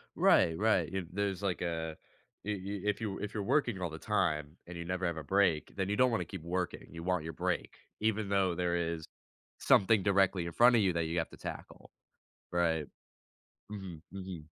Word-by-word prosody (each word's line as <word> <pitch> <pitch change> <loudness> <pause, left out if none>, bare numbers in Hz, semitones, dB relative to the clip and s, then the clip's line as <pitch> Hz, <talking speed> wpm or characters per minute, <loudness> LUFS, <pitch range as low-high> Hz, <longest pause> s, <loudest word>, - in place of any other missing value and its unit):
Right, 80 -1 +4
right. 100 -6 +2
Y 95 - -1
if 90 - -5
there's 100 0 -1
like 95 -4 -1
a 80 -2 -2 0.5
i - - -3
if 100 +1 -2
you 105 -3 -2
if 105 - -4
you're 105 - -2
working 120 -4 +1
all 90 - -1
the 80 - -7
time, 75 +2 0
and 90 0 -7
you 85 - -5
never 90 +1 -2
have 85 -1 -2
a 80 - -5
break, 90 -2 +2
then 95 -1 -1
you 105 - +1
don't 125 +2 +4
wanna 115 - 0
keep 95 -5 -8
working. 90 +1 -3
You 85 0 -7
want 90 -2 0
your 80 +1 -5
break, - - -2 0.2
even 110 -1 0
though 95 -2 +2
there 90 -1 0
is 85 -2 -2 0.5
something 100 0 +4
directly 95 -3 +3
in 85 - -4
front 120 +5 +6
of 115 - +5
you 95 -3 +2
that 85 -1 0
you 80 +2 -2
have 80 - -2
to - - -12
tackle. - - -8 0.6
Right. 80 -3 +1 0.9
Mhm, 95 -6 -7
mhm. 95 -4 -6
90 Hz, 205 wpm, -32 LUFS, 85-100 Hz, 0.9 s, front